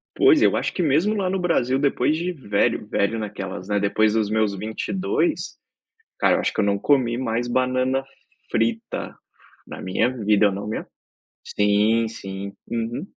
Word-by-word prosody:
Pois, 355 -5 +5
eu - - +4
acho - - -1
que 180 - -1
mesmo 165 +8 +2
lá 195 -3 0
no 190 0 -1
Brasil 135 -7 +1
depois 140 0 +1
de 175 +3 -2
velho 105 - 0
velho 105 +3 0
naquelas, 100 -3 -6
né 105 0 +1
depois 105 +2 +2
dos 110 -2 +1
meus 110 -1 +1
22, 185 - -2 0.6
cara, - - +4
eu - - 0
acho - - -1
que - - -1
eu - - +2
não 100 0 +1
comi 120 -1 +2
mais 120 -1 -1
banana 130 +1 0 0.5
frita, 115 0 -2 0.5
na - - -8
minha 95 +6 +1 0.2
vida 105 -1 +4
não 100 +2 -5
me 110 - -4 0.6
sim, 105 +3 +2
sim, 100 -2 -7 0.2
uhum. 120 +7 -3
115 Hz, 165 wpm, -23 LUFS, 105-135 Hz, 0.6 s, Pois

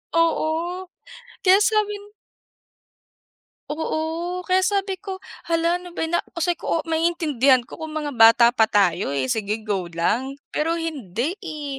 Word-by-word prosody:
Oo, 335 +2 0 0.8
sabi 425 -1 +2 1.8
Oo, 325 +3 -3
kaya 370 +1 +2
sabi 390 -1 -1
ko 385 -1 -7 0.2
"Hala, 335 +1 +1
ano 355 -1 -12
ba - - -3
yan!" 325 - -2
na - - +1 0.2
sabi 345 +1 0
ko, 330 - -1
maiintindihan 305 -6 +2
ko 235 - -12
kung 315 -1 -7
mga 300 -2 -2
bata 230 +1 +8
pa 230 -3 +3
tayo 190 -7 +1
eh, 130 -2 -1
sige, 215 0 -2
go 200 -4 -2
lang. 210 +11 -1 0.2
Pero 325 +2 0
hindi 305 - -3
eh, 300 -7 -6
315 Hz, 140 wpm, -23 LUFS, 235-350 Hz, 1.8 s, bata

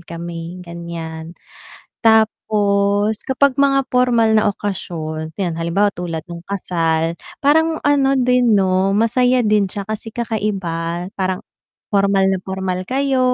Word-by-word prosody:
kami 170 +1 -7
ganyan. 170 -1 -7 0.7
Tapos 210 -1 +2
kapag 270 0 +2
mga 275 -1 +2
pormal 235 -3 +3
na 215 -1 +3
okasyon, 160 -6 -5
ayan 175 -4 -1
halimbawa 170 +5 +1
tulad 170 -2 -4
nung 170 0 -8
kasal, 165 -4 -1 0.2
parang 320 +2 +3
ano 280 -2 +3
din 250 -2 +3
'no, 190 0 +2
masaya 245 +4 +3
din 210 -3 +3
siya 200 +2 -6
kasi 220 +1 -5
kakaiba, 185 -7 -3
parang 185 -1 -1 0.5
pormal 195 -1 +2
na 190 - +2
pormal 190 -1 -3
kayo 270 +2 0
200 Hz, 120 wpm, -19 LUFS, 170-230 Hz, 0.7 s, pormal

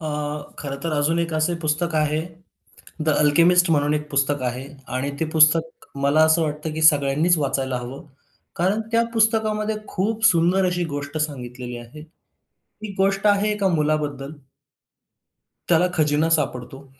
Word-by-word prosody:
अ, 155 - -6 0.5
खरं 140 -2 -5
तर 165 - -2
अजून 155 +3 +1
एक 170 -1 -2
असे 155 +2 0
पुस्तक 160 +2 -1
आहे, 155 0 +1 0.9
The 155 - +3
Alchemist 170 +4 +4
म्हणून 145 -1 +2
एक 150 0 -3
पुस्तक 140 0 0
आहे. 125 +2 -4 0.2
आणि 130 +3 -3
ते 160 - 0
पुस्तक 160 +1 +2 0.2
मला 145 +3 +4
असं 160 +1 +3
वाटतं, 150 0 -3
की 160 - -4
सगळ्यांनीच 155 +3 +3
वाचायला 135 -2 -1
हवं. 130 +6 -9 0.5
कारण 190 +6 0
त्या 230 0 +3
पुस्तकामध्ये 220 -1 +1
खूप 220 +4 -1
सुंदर 180 -1 +3
अशी 180 -1 -1
गोष्ट 145 +1 -5
सांगितलेली 125 -5 -5
आहे. 120 +5 -12 0.6
ही 210 -1 -11
गोष्ट 195 +1 +1
आहे 205 +1 +3
एका 200 -2 0
मुलाबद्दल. 150 -3 -1 1.4
त्याला 175 +1 +4
खजिना 150 0 +1
सापडतो. 135 -1 -5
155 Hz, 145 wpm, -22 LUFS, 145-180 Hz, 1.4 s, Alchemist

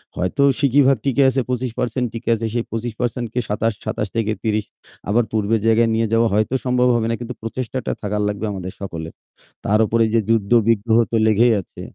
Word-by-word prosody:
হয়তো 90 +10 0 0.2
সিকি 140 -1 +3
ভাগ 135 -1 +4
টিকে 135 0 +3
আছে 130 0 0
২৫% 125 0 -2
টিকে 115 +1 -5
আছে। 115 +1 -4
সেই 120 -1 -1
২৫% 120 +1 -3 0.2
২৭, 105 +2 0
২৭-৩০। 110 0 -2 0.4
আবার 115 +4 +3
পূর্বের 110 0 0
জায়গায় 115 +1 +4
নিয়ে 115 0 +1
যাওয়া 115 0 +4
হয়তো 110 +5 +1
সম্ভব 125 0 +2
হবে 115 -1 0
না। - - 0
কিন্তু 120 +1 -6
প্রচেষ্টাটা 125 +2 -4
থাকার 105 0 -2
লাগবে 105 +1 -3
আমাদের 95 -1 -6
সকলের। 80 -4 -6 0.5
তার 105 +1 +2
ওপর 115 - 0
এইযে 115 +1 +1
যুদ্ধ-বিগ্রহ 115 0 +3
তো - - 0
লেগেই 115 +2 +4
আছে। - - -13
115 Hz, 170 wpm, -20 LUFS, 105-120 Hz, 0.5 s, ভাগ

